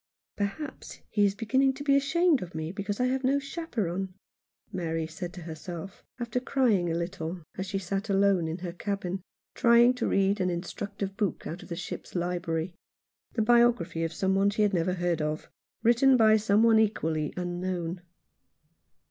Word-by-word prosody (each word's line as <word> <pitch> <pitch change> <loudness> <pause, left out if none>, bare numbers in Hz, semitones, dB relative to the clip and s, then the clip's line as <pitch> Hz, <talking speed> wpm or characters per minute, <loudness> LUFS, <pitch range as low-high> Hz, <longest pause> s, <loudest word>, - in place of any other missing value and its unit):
"Perhaps 205 +10 -5
he 205 -1 +3
is 200 0 +1
beginning 265 +4 +2
to 285 - -6
be 280 -1 +4
ashamed 300 +2 +3
of 175 -3 -8
me 160 +1 -3
because 200 +2 -4
I 250 - +3
have 260 +1 0
no 270 +2 +3
chaperon," 210 - -3 0.6
Mary 165 -2 -2
said 175 +3 -6
to 180 - -9
herself, 170 +3 -8 0.2
after 240 +1 -1
crying 240 -9 +2
a 165 - 0
little, 170 -1 -4
as 190 +1 -4
she 195 +1 -2
sat 195 +2 -3
alone 195 -3 +3
in 160 +1 -3
her 175 - -3
cabin, 190 0 -3 0.3
trying 235 +1 +6
to 250 - -2
read 195 +1 +2
an 185 - +2
instructive 195 +3 -4
book 205 -6 -1
out 170 +3 -5
of - - -13
the 170 - -3
ship's 175 +2 -7
library 175 -1 -1 0.3
— - - -45
the 225 - +2
biography 235 -8 +3
of 165 - -1
some 190 +3 0
one 195 +1 +3
she 210 +1 +1
had 205 -1 +2
never 180 +1 +1
heard 175 -3 0
of, 150 +1 -3 0.3
written 250 +3 +5
by 220 -2 +6
some 210 0 +3
one 225 -1 +6
equally 160 -8 0
unknown. 175 -1 -3
195 Hz, 180 wpm, -28 LUFS, 175-230 Hz, 0.6 s, trying